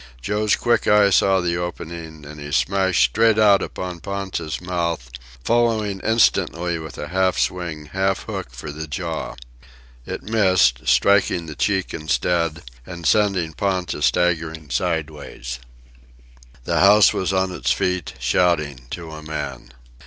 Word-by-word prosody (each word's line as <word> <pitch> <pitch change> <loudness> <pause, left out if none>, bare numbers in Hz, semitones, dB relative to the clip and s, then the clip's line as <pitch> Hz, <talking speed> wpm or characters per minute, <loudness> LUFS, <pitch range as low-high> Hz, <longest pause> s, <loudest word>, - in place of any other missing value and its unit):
Joe's 105 - +1
quick 120 -1 +1
eye 105 -1 +5
saw 95 0 +4
the 85 -1 -1
opening, 85 -3 -6
and 75 +1 -10
he 75 0 -7
smashed 95 +7 +2
straight 110 0 +3
out 105 -2 +5
upon 90 -2 -5
Ponta's 95 -5 -4
mouth, 85 -8 -3 0.3
following 110 -4 +1
instantly 90 -6 +1
with 80 -1 -9
a 75 - -6
half 95 +1 +1
swing, 85 -4 -2
half 95 +4 -1
hook, - - -5
for 65 +5 -8
the 80 +2 -7
jaw. 70 - -4 0.7
It - - -5
missed, 95 - +2
striking 100 -4 +3
the 80 - -7
cheek 95 +3 -1
instead, 85 +1 -1 0.2
and 85 +3 -9
sending 95 -1 +2
Ponta 90 -3 -2
staggering 80 -2 0
sideways. 75 -8 -3 1.0
The - - 0
house 105 +1 +6
was 95 - -1
on 95 0 0
its 90 - -3
feet, 90 -3 -1
shouting, 70 -1 0
to 85 +1 -7
a 80 0 -8
man. 70 -5 -6
85 Hz, 140 wpm, -21 LUFS, 75-95 Hz, 1.0 s, house